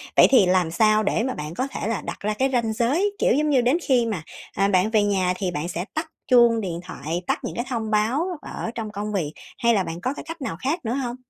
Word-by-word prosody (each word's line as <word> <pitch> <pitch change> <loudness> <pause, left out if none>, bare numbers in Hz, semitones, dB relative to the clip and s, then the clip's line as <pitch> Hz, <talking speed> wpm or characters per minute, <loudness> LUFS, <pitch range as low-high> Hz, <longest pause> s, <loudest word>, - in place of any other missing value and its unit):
vậy - - +8
thì 255 -8 +6
làm 180 -2 +2
sao 215 +4 +3
để 220 - +1
mà 260 - -1
bạn 150 -3 -6
có 260 +8 -2
thể - - -4
là 230 - -1
đặt - - -6
ra 210 +1 -1
cái 260 +5 +1
ranh 230 -3 +1
giới, 290 - +1
kiểu - - +3
giống 300 +3 +1
như, 270 -4 +4
đến 250 +6 +3
khi 250 -3 +3
mà, 205 -8 -3 0.3
à, 195 +1 +2
bạn 190 +1 +3
về 215 -2 +4
nhà 190 -3 +1
thì 185 -3 -2
bạn 155 +1 -3
sẽ 175 0 -4
tắt 315 +1 -2 0.2
chuông 235 -3 +5
điện 175 -4 -4
thoại, 165 +2 -4
tắt - - 0
những - - -5
cái 240 - -2
thông 225 -3 -2
báo 225 +9 +2 0.2
ở 225 - -5
trong 220 -2 -4
công 210 +1 -4
việc 160 -7 -2 0.3
hay 235 -2 +3
là 195 - +2
bạn 170 0 -6
có 260 - -1
cái - - -8
cách 330 -1 -7
nào 165 -11 -4
khác 290 +2 -1
nữa 225 - -1
hông? 250 -3 -2
220 Hz, 270 wpm, -23 LUFS, 185-255 Hz, 0.3 s, vậy